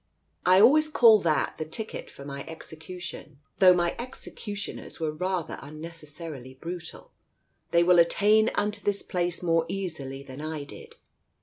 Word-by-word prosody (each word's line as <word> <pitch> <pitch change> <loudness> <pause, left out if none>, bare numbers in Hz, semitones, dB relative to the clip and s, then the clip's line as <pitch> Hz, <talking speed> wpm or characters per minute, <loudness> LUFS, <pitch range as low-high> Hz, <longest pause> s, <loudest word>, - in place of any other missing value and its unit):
"I 185 +1 +7
always 300 +8 +6
call 230 -7 +7
that 160 -5 0
the - - 0
ticket 215 +8 -6
for 140 - -11
my 140 0 -6
execution. 160 -1 -8 0.2
Though 185 -1 +8
my 175 -1 +1
executioners 215 -4 -7
were 160 -2 -1
rather 180 0 -2
unnecessarily 155 -3 -9
brutal. 170 +4 -7 0.6
They 170 0 +4
will 175 0 +6
attain 210 +6 +4
unto 210 0 -1
this 200 -1 -1
place 175 -1 -2
more 165 -1 +3
easily 145 -8 -4
than 135 +1 -9
I 155 -1 -4
did. 140 - -12
170 Hz, 140 wpm, -27 LUFS, 155-195 Hz, 0.6 s, Though